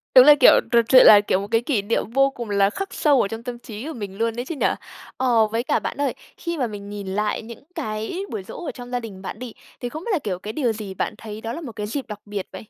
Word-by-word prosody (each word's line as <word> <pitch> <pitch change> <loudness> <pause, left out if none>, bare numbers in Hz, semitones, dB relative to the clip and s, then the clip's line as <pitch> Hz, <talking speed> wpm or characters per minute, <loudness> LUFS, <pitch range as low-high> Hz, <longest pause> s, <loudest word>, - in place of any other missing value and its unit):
Đúng 255 - +10
là, 295 0 +9
kiểu - - +8
trật 235 -1 +4
sự 255 -1 +9
là, 205 -1 +9
kiểu, 195 -2 +1
một 200 - -5
cái 225 0 +3
kỷ 240 -4 0
niệm 210 +1 -1
vô 275 +2 +4
cùng 240 -4 -7
là 200 -1 +3
khắc 390 - -5
sâu 285 -5 +3
ở - - +1
trong 225 +3 -7
tâm 245 -1 -6
trí 220 +1 -8
của 320 - -5
mình 200 -6 -7
luôn 230 +1 0
ấy 245 - -3
chứ 330 - -5
nhỉ? - - +2 0.5
Ờ, 235 -4 +3
với 225 +2 -2
cả - - +1
bạn - - -5
ơi, 285 - +1 0.2
khi 340 -1 -4
mà 255 -4 0
mình 205 -2 -8
nhìn 205 -1 -6
lại 210 +2 -1
những 230 +1 -11
cái 225 - -3
buổi 210 -3 -4
giỗ 330 - -8
ở - - -3
trong 245 -1 -10
gia 245 - 0
đình 210 -5 -9
bạn 195 - -7
đi, 245 -3 -7 0.3
thì 245 - -4
không 310 +6 -7
biết 470 - -3
là, 370 - +2
kiểu, 195 -9 -4
cái 215 +3 -6
điều 245 -7 0
gì 210 -3 -6
bạn - - -2
thấy 215 -1 -8
đó 230 +1 -4
là 335 - -6
một 275 -7 -7
cái 210 -1 -5
dịp 270 +4 -4
đặc 210 -2 -7
biệt 205 -2 -5
vậy? - - -10
230 Hz, 305 wpm, -23 LUFS, 210-260 Hz, 0.5 s, Đúng